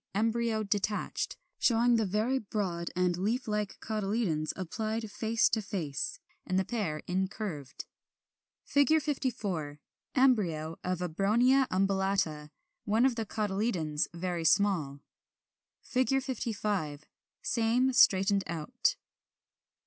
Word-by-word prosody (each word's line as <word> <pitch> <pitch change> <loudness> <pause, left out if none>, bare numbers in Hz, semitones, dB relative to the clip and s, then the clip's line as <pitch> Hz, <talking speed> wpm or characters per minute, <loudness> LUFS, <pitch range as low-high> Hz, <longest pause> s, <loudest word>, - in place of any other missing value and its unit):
Embryo 225 +1 +1
detached; 205 0 -2 0.2
showing 235 0 +4
the 220 -3 +1
very 220 +7 +1
broad 190 -6 -3
and 180 -1 +1
leaf 220 +8 -1
like 210 -1 -2
cotyledons, 205 -7 -1
applied 220 +4 -3
face 225 +2 +2
to 220 - 0
face, 190 - -3 0.2
and 185 - -1
the 190 - +2
pair 185 -10 -2
incurved.] 185 - -3 0.8
[Illustration: 285 +3 +4
Fig. - - -9
54. 200 - -2 0.4
Embryo 180 - +2
of 180 -1 -2
Abronia 235 +10 +3
umbellata; 190 -5 0 0.3
one 220 +4 +3
of 260 -3 +2
the 225 -2 -3
cotyledons 195 -8 -1
very 170 0 -3
small. 160 -6 +2 0.8
55. 220 - -1 0.4
Same 245 +3 +2
straightened 195 -4 +5
out. 160 -2 -1
205 Hz, 105 wpm, -30 LUFS, 175-230 Hz, 0.8 s, straightened